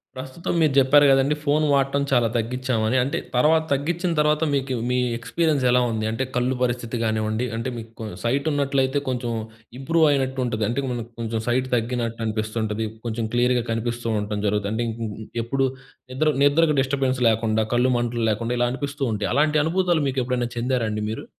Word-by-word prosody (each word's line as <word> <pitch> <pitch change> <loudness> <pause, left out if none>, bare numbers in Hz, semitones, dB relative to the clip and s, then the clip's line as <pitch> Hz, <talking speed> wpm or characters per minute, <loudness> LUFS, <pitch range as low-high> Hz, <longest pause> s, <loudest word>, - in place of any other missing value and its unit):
ప్రస్తుతం 130 +5 -5
మీరు 155 -3 +3
చెప్పారు 140 +2 +6
కదండీ, 135 +2 +3
ఫోన్ 150 +1 +2
వాడటం 140 0 +2
చాలా 120 -3 +4
తగ్గించామని. 120 0 0
అంటే, 135 - -2 0.2
తర్వాత 155 +5 +4
తగ్గించిన 170 +6 0
తర్వాత 150 +1 +2
మీకు 135 -1 -1 0.2
మీ 125 - +1 0.2
ఎక్స్‌పీరియన్స్ 145 +4 0
ఎలా 125 - +4
ఉంది? 110 -1 -2
అంటే 115 +4 -1
కళ్ళు 125 +1 +1
పరిస్థితి 120 -1 -1
గానివ్వండి, 110 +1 0
అంటే 115 +3 -3
మీకు 115 0 -8 0.2
సైటున్నట్లయితే 140 +1 +1
కొంచెం 125 -2 -2 0.5
ఇంప్రూవ్ 160 +4 +2
అయినట్టు 135 -1 0
ఉంటది. 110 -3 -2
అంటే, 120 +4 -1
మనకు 120 -1 -5
కొంచెం 115 -1 -2
సైట్ 130 +2 +1
తగ్గినట్టనిపిస్తుంటది. 110 -2 -2 0.2
కొంచెం 115 -1 -2
క్లియర్‌గా 120 0 +2
కనిపిస్తూ 120 +1 -2
ఉండటం 105 0 -3
జరుగుతది. 100 0 0
అంటే 115 +2 -1
ఇ 115 0 -4 0.2
ఇ - - -11 0.2
ఎప్పుడు 135 +3 0 0.5
నిద్ర 135 +5 0 0.2
నిద్రకు 150 +2 +4
డిస్టర్బెన్స్ 130 -1 0
లేకుండా, 110 0 +1
కళ్ళు 125 +2 +3
మంటలు 120 -1 -1
లేకుండా 115 +3 -2
ఇలా 120 - +3
అనిపిస్తూ 140 +2 -4
ఉంటాయి. 105 - -2
అలాంటి 150 +2 +3
అనుభూతులు 175 -1 +1
మీకెప్పుడైనా 125 -2 -1
చెందారా 120 -1 0
అండి 105 0 -3
మీరు? 110 - -5
125 Hz, 165 wpm, -23 LUFS, 115-140 Hz, 0.5 s, చెప్పారు